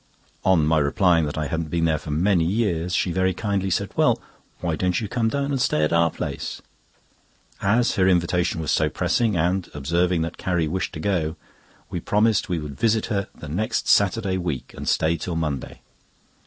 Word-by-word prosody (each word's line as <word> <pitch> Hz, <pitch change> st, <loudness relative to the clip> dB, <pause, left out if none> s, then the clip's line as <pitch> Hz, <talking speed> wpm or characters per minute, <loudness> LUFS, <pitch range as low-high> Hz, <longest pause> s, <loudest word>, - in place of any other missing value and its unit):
On 90 Hz, -5 st, +4 dB
my 80 Hz, +1 st, +3 dB
replying 80 Hz, +3 st, +3 dB
that 75 Hz, -, -4 dB
I 75 Hz, -, -1 dB
hadn't 80 Hz, +2 st, -3 dB
been 85 Hz, +1 st, 0 dB
there 80 Hz, -2 st, +1 dB
for 75 Hz, -, -9 dB
many 85 Hz, +3 st, +2 dB
years, 90 Hz, -2 st, 0 dB
she 90 Hz, -, +1 dB
very 95 Hz, +1 st, +1 dB
kindly 100 Hz, -1 st, -1 dB
said: -, -, -1 dB
"Well, -, -, +3 dB, 0.4 s
why 85 Hz, -3 st, -1 dB
don't 90 Hz, +1 st, 0 dB
you 110 Hz, -, -3 dB
come 115 Hz, +1 st, 0 dB
down 140 Hz, +2 st, -1 dB
and 135 Hz, -2 st, 0 dB
stay 75 Hz, -, +2 dB
at 75 Hz, -, +1 dB
our 85 Hz, 0 st, +4 dB
place?" -, -, -5 dB, 1.0 s
As 115 Hz, +5 st, +2 dB
her 95 Hz, -1 st, +4 dB
invitation 90 Hz, -1 st, +1 dB
was 80 Hz, -, -1 dB
so -, -, +2 dB
pressing, 110 Hz, -6 st, +1 dB
and 90 Hz, +3 st, 0 dB
observing 85 Hz, +4 st, +1 dB
that 85 Hz, -, -5 dB
Carrie 85 Hz, -3 st, 0 dB
wished 95 Hz, +5 st, -2 dB
to 80 Hz, -, -6 dB
go, 80 Hz, -3 st, -1 dB, 0.6 s
we -, -, -2 dB
promised 105 Hz, 0 st, +1 dB
we 90 Hz, -, 0 dB
would 75 Hz, -3 st, -7 dB
visit 110 Hz, -1 st, +2 dB
her 100 Hz, -1 st, -1 dB
the 75 Hz, -, -9 dB
next 90 Hz, +9 st, -1 dB
Saturday 100 Hz, -1 st, +2 dB
week, 80 Hz, -8 st, -4 dB
and -, -, -3 dB
stay 80 Hz, +1 st, +2 dB
till 90 Hz, 0 st, -4 dB
Monday. 75 Hz, -5 st, -3 dB
90 Hz, 195 wpm, -23 LUFS, 80-100 Hz, 1.0 s, On